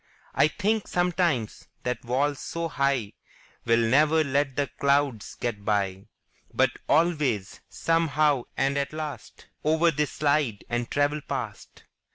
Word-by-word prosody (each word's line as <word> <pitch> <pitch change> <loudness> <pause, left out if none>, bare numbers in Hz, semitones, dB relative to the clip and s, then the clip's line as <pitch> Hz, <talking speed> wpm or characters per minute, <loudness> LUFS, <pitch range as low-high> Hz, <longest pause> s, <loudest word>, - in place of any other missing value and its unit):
I - - +4
think 210 +6 -1
sometimes 175 - 0 0.2
that 125 0 -2
walls 135 +4 0
so 165 0 -3
high 140 -7 0 0.5
Will 115 0 +3
never 155 +5 +4
let 140 -1 0
the 145 - +1
clouds 140 -5 +1
get 110 -4 -4
by; 100 -2 -1 0.4
But - - +2 0.2
always, 145 - +1
some 165 0 +1
how 145 -4 +2
and 140 +1 +1
at 140 +1 -3
last, 155 -2 -7 0.2
Over 160 +2 +3
they 150 -1 0
slide 140 -9 0
and 120 0 -2
travel 145 +1 +1
past. - - -6
140 Hz, 135 wpm, -26 LUFS, 120-155 Hz, 0.5 s, I